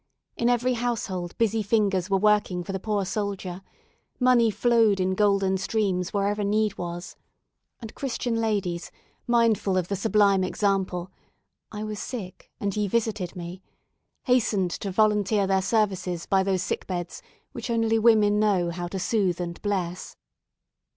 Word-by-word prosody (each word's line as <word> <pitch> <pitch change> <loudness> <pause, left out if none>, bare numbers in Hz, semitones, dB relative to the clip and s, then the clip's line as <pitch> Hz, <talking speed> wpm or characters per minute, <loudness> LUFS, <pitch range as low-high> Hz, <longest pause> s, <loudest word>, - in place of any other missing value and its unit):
In 235 - +1
every 245 +1 +2
household 215 -7 -3
busy 225 -1 +1
fingers 200 -3 +1
were 195 - +3
working 205 -3 +2
for 185 - -6
the 190 - -3
poor 205 -1 -1
soldier 195 -2 -4 0.6
money 250 -3 +4
flowed 220 -1 +3
in 185 0 +1
golden 195 -1 +2
streams 190 -3 -1
wherever 205 0 0
need 210 +1 +1
was 175 0 -6 0.7
and 225 -2 -8
Christian 250 -3 -3
ladies, 205 -6 -1 0.4
mindful 230 -5 +2
of 180 -2 -1
the 200 - 0
sublime 200 -1 +3
example, 190 -2 -1 0.6
"I 210 0 -5
was 215 -1 -5
sick, 200 -8 -7
and 200 -1 -2
ye 210 -1 0
visited 210 -4 -1
me," 175 +1 -7 0.6
hastened 215 -8 +2
to 200 - -4
volunteer 210 0 +2
their 190 0 +2
services 190 -4 0
by 195 -1 +2
those 190 -1 0
sick - - -3
beds 175 -2 -4 0.3
which - - -6
only 225 -1 +2
women 215 -2 +4
know 190 -5 +2
how 175 +1 -4
to 190 - -5
soothe 185 -2 0
and 170 -1 -5
bless. 185 -4 -3
200 Hz, 150 wpm, -25 LUFS, 185-220 Hz, 0.7 s, money